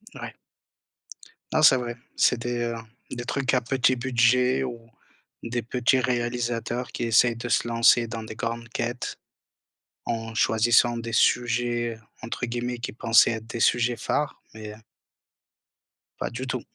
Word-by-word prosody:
Ouais. - - -7 1.2
Non 155 - +2
c'est 135 -3 +8
vrai, 120 -1 -5 0.2
c'est 125 - +3
des, 120 0 -3
heu, 120 0 -2 0.3
des 120 -1 -5
trucs 135 +1 0
à 125 - +2
petit 130 +1 +1
budget 125 +1 +2
ou 120 -3 -5 0.6
des 120 0 -3
petits 125 +2 +1
réalisateurs 120 0 -2
qui - - -3
essaient 115 +1 +4
de 120 +1 -6
se 110 - +1
lancer 115 0 +4
dans 115 0 -5
des 110 - -8
grandes 115 0 -4
quêtes. 120 +1 -4 0.9
En 115 -1 -4
choisissant 120 +2 +3
des 115 0 -5
sujets, 120 -1 +1
heu, 110 - -19 0.2
entre 115 +2 -4
guillemets 120 +1 -3
qui 120 - -6
pensaient 115 0 +4
être 115 -1 -5
des 120 - -6
«sujets 120 +1 +2
phares» 150 - -2
mais 110 -1 -8 1.5
Pas - - -2
du 125 +2 -6
tout. 125 -2 -3
120 Hz, 150 wpm, -25 LUFS, 115-125 Hz, 1.5 s, c'est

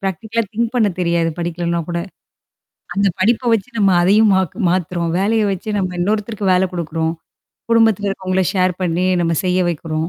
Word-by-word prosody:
பிராக்டிகலா 215 +5 -2
think 230 +1 -1
பண்ண 225 -4 +3
தெரியாது 170 -1 +1
படிக்கலன்னா 170 0 -2
கூட. 170 0 -2 1.0
அந்த 200 0 +2
படிப்ப 235 +4 +2
வச்சு 225 +1 0
நம்ம 195 -2 +4
அதையும் 210 +4 +4
மாத் 190 -4 0
மாத்துறோம். 175 -1 -1
வேலைய 215 +3 +1
வச்சு 190 +3 -6
நம்ம 185 -2 -1
இன்னொருத்தருக்கு 210 +1 -1
வேல 180 +1 +3
குடுக்குறோம். 165 -2 -2 0.6
குடும்பத்துல 220 -3 +3
இருக்கவங்கள 190 -1 -1
ஷேர் 185 -1 +2
பண்ணி 180 +1 0 0.2
நம்ம 165 0 +1
செய்ய 180 0 +1
வைக்கிறோம். 160 0 -3
185 Hz, 155 wpm, -18 LUFS, 170-210 Hz, 1.0 s, நம்ம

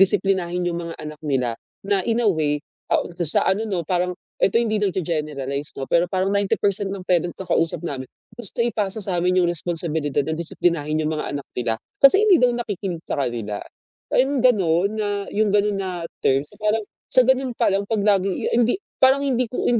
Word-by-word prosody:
disiplinahin 180 -2 +2
'yung 170 0 -3
mga 170 -1 -6
anak 150 0 -8
nila 130 -5 0 0.3
na, 200 -1 +1
in 230 +1 +2
a - - +5
way, 150 -3 0 0.3
ah, - - +3 0.2
sa 160 -3 +5
ano 205 +4 +1
'no, 175 -5 -2
parang 180 +1 -1 0.3
eto 215 +4 +4
hindi 220 -2 0
nag-ge-generalize 150 -7 -2
'no, 135 - -3
pero 170 +1 +3
parang 190 +1 0
90% 200 0 0
ng 190 -2 -6
parents 175 -1 +1
na 190 - -6
kausap 165 0 +1
namin, 130 -3 -4 0.3
gusto 235 -2 -5
ipasa 220 -3 0
satin 180 -2 0
'yung 180 -1 +3
responsibilidad 160 -4 -1
na 160 - -1
disiplinahin 160 -2 -1
'yung 155 0 -1
mga 150 - -3
anak 140 - -9
nila 115 -2 -1 0.2
kasi 380 +9 +8
hindi 380 -4 +7
daw 250 - +5
nakikinig 205 -7 -3
sa - - -2
kanila. 110 -4 -3 0.5
Ayun, 265 0 +2
ganun 195 -6 +3
na 205 -1 -1
'yung 210 0 +1
ganon 205 -1 +2
na 180 -3 -4 0.2
terms. 135 +2 +1
Parang 215 +1 +1 0.3
sa 255 - +7
ganun 260 -1 +1
palang, 200 +1 +1
pag 215 -2 0
laging 195 -2 +2
i - - -4
a - - +1
hindi 240 0 +3 0.2
parang, 265 +1 +5
hindi 255 -3 +1
ko 250 - -4
185 Hz, 190 wpm, -22 LUFS, 160-210 Hz, 0.5 s, kasi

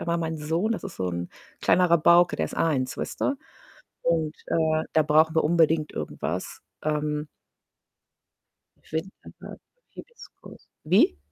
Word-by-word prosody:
aber 170 0 -1
mein 160 -1 -3
Sohn, 165 +9 -1
das 225 - -5
ist - - -8
so 95 - -2
'n 85 0 -4 0.3
kleiner 180 -1 +3
Rabauke, 170 +1 +5
der - - 0
ist - - -9
1, 135 -6 0
weißt - - -5
du? - - +1 0.7
Und, 160 -2 0
äh, 160 -1 +1
da 160 - +4
brauchen 155 +2 +3
wir 160 - +3
unbedingt 160 -1 +2
irgendwas. - - -5 0.2
Ähm 150 0 -1 1.6
Winterharten 160 +5 -7 0.3
Hibiskus 480 -1 -14 0.2
wie? 155 - +3
160 Hz, 135 wpm, -25 LUFS, 150-170 Hz, 1.6 s, Rabauke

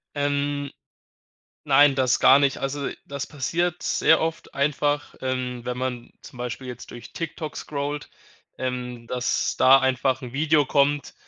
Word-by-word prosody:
Ähm, 145 0 -1 0.9
nein, 145 -1 +5
das 130 -2 +2
gar 135 +2 +7
nicht. 140 -1 +2
Also, 140 +1 -3 0.2
das 140 -1 -5
passiert 170 +5 -2
sehr 160 - +3
oft 165 -3 -4
einfach, 145 +1 0
ähm, 125 -2 -2
wenn 125 0 -4
man 125 -2 -4
zum 125 - -13
Beispiel 125 +1 -5
jetzt 125 -1 -8
durch 120 -1 -11
TikTok 165 -2 -5
scrollt, 145 0 -4 0.5
ähm, 125 -2 -4
dass 125 0 -1
da 135 +1 +7
einfach 130 0 +1
'n 125 0 -8
Video 150 0 +3
kommt, 145 +1 +1
140 Hz, 145 wpm, -24 LUFS, 125-145 Hz, 0.9 s, gar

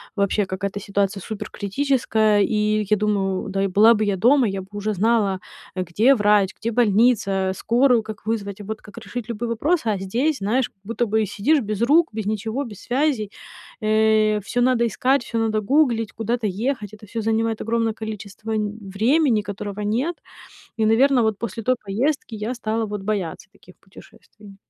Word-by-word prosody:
вообще 200 0 +1
какая-то 190 +2 -4
ситуация 200 -1 -1
суперкритическая. 220 0 0
И 210 0 +1
я 210 - +4
думаю: 200 -1 -1
"Да 195 0 -1
и - - +2
была 210 +5 +6
бы 215 0 0
я 200 -1 +1
дома, 245 +6 +4
я 195 -1 -3
бы 190 - -13
уже 205 +1 -2
знала, 205 -1 +1 0.4
где 195 +9 +3
врач, 205 -3 +3
где 230 +1 -2
больница, 210 -4 +2
скорую 240 +1 +3
как 215 -2 -9
вызвать, 210 -3 -3
а, - - -8
вот 215 +2 -6
как 205 - -15
решить 235 0 -6
любые 235 0 -4
вопросы". 285 +4 0
А 210 - +1
здесь, 250 +11 0
знаешь, 220 +6 0
как - - -45
будто 230 +3 -2
бы, 220 +1 +1
сидишь 280 - +1
без 215 -1 -4
рук, 310 +7 +4
без 220 -1 -4
ничего, 220 +5 -2
без 215 -6 -10
связей. 250 -5 0 0.5
Э, 215 0 +3
всё 245 - -1
надо 245 -1 +3
искать, 255 +4 +1
всё 230 - -3
надо 220 -1 0
гуглить, 235 -2 +1
куда-то 225 +1 -2
ехать. 215 +1 -3
Это 215 0 -12
всё 225 +2 -4
занимает 225 0 0
огромное 230 -1 0
количество 215 0 -7
н 210 0 -2
времени, 220 +5 +2
которого 205 0 -6
нет. 245 +12 -1 0.6
И, 220 - +1
наверное, 250 +4 +4
вот 220 -2 0
после 225 0 -5
той 255 +3 +2
поездки 235 +5 -1
я 215 +3 -3
стала 225 -2 -2
вот 210 -1 -5
бояться 195 -4 -3
таких 185 - -19
путешествий. 200 +1 -16
215 Hz, 175 wpm, -22 LUFS, 205-235 Hz, 0.6 s, была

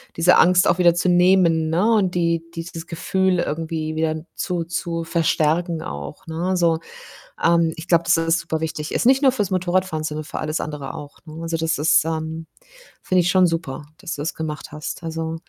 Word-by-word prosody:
diese 165 +2 +5
Angst 180 +1 +5
auch 175 - +2
wieder 175 -1 +4
zu 180 +1 +1
nehmen, 175 -3 +4
ne? 210 +8 +3
Und 185 -4 +1
die 170 -1 +1
dieses 165 0 -7
Gefühl 185 +2 0
irgendwie 155 0 -3
wieder 160 0 -1
zu 175 -2 -2
zu 170 0 -3
verstärken 165 0 0
auch, 70 0 -7
ne? 165 +3 -3
Also, 170 -3 +2 0.6
ähm, 170 -1 +3
ich 165 +2 -10
glaube, 170 -1 +3
dass - - +4
das 165 0 +2
superwichtig 160 -2 -4
ist, - - 0
nicht 265 +2 +5
nur 265 -2 +4
für's 210 -7 -1
Motorradfahren, 185 -3 0
sondern 155 0 -4
für 155 - -6
alles 155 +1 -2
andere 145 -3 -6
auch, 145 -3 -10
ne? 160 +1 -9
Also 165 0 -2
das 160 -2 0
ist, 155 +1 +3
ähm 160 0 -4 0.6
finde 185 -1 +2
ich 175 - 0
schon 185 -1 +5
super, 160 -4 -4
dass 190 -3 -5
du 145 - -6
das 155 - -2
gemacht 155 -2 -5
hast. 150 +3 -6
Also 160 0 -3
165 Hz, 195 wpm, -21 LUFS, 160-175 Hz, 0.6 s, diese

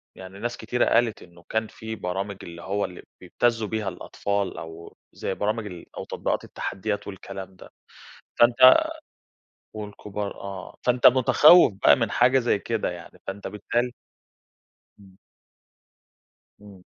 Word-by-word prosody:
يعني 95 +1 -11
ناس 120 +2 -3
كتيرة 120 +2 0
قالت 115 -1 +2
إنه 85 -1 -18
كان 110 0 0
في 110 +1 -7
برامج 95 +1 -4
اللي 85 0 -9
هو 100 +3 -1
اللي 90 - -9 0.2
بيبتزّوا 115 +4 0
بيها 110 -2 -2
الأطفال، 100 +2 -3
أو 80 +1 -10 0.2
زي - - -3
برامج 105 +1 -1
ال 90 -4 -9
أو - - -4
تطبيقات - - -2
التحديات 105 +1 -4
والكلام 95 -1 -8
ده - - -14 0.7
،فأنت 125 +2 +7 0.9
والكبار 105 -1 -6
آه، 95 -1 -8
فأنت 125 0 +5
متخوّف 130 - +6
بقى - - +8
من 115 -6 -1
حاجة 130 +2 +4
زي 115 -5 +1
كده 115 0 -2
يعني 85 -1 -11
فأنت 100 +1 -5
بالتال 120 +4 -2 1.1
إمم. 95 -2 -18 1.5
إمم. 100 -3 -14
105 Hz, 135 wpm, -25 LUFS, 95-115 Hz, 1.5 s, بقى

